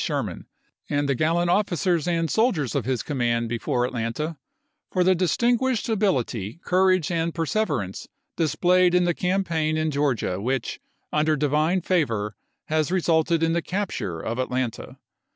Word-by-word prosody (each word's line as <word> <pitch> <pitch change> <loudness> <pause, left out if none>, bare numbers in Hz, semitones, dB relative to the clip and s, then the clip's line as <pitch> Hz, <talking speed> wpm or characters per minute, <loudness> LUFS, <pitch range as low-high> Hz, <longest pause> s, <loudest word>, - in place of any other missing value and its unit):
Sherman, - - -3 0.4
and 145 0 0
the 140 - +2
gallant 165 +5 +1
officers 180 -4 +1
and 165 -1 +1
soldiers 195 - +1
of - - -1
his 130 -2 -1
command 120 -4 0
be 120 0 -2
fore 125 +1 0
Atlanta, 125 +7 -3 0.6
for 185 - +2
the 185 +1 +5
distinguished 235 +7 +1
ability, 135 - 0
courage, 185 -2 +3
and 165 -1 -1
perseverance 155 - -1 0.3
displayed 180 +2 +3
in 180 - +4
the 175 0 +2
campaign 165 -4 0
in 155 0 0
Georgia 130 -10 0
which, 130 +2 -2 0.3
under 155 +1 +2
Divine 150 +5 +1
favor, 115 - 0 0.3
has 155 +1 0
resulted 165 -2 +2
in 165 0 +2
the 170 - +1
capture 155 - -3
of 115 +8 -4
Atlanta. 130 -2 -3
160 Hz, 145 wpm, -24 LUFS, 130-180 Hz, 0.6 s, the